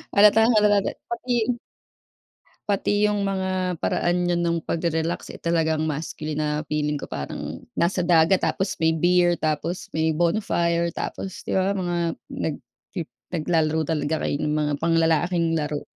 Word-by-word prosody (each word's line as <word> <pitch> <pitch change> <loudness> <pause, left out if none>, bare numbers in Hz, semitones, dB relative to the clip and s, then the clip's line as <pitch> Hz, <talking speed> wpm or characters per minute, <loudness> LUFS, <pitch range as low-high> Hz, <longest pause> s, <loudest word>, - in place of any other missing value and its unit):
Halatang-halata 210 -1 +5 0.2
pati. 240 +1 -2 1.3
Pati 205 +1 +2
'yung 205 -1 0
mga 185 -2 -1
paraan 175 +1 +1
niyo 175 - +2
nang 170 -1 +1
pag-relax, 165 +1 -2
eh, - - -11
talagang 160 -2 +1
masculine 155 0 -4
na 150 -1 0 0.2
feeling 150 -1 -1
ko - - -7
parang 70 -1 -6
nasa 180 +1 +1
dagat, 170 +1 +4
tapos 190 +1 0
may 160 0 +4
beer, 175 +1 +3
tapos 160 +3 -2
may 160 0 +2
bonfire, 170 0 +1
tapos 190 - -6
'di - - -2
ba 190 +1 +2
mga 175 -2 -1 0.3
nag 155 - -3 0.4
pi 180 - -2 0.3
nag-lalaro 160 -1 +1
talaga 155 0 -1
kayo - - 0
ng 150 0 0
mga 150 -1 0
pang-lalaking 165 +1 +2
laro. 150 -1 -3
170 Hz, 140 wpm, -24 LUFS, 160-185 Hz, 1.3 s, Halatang-halata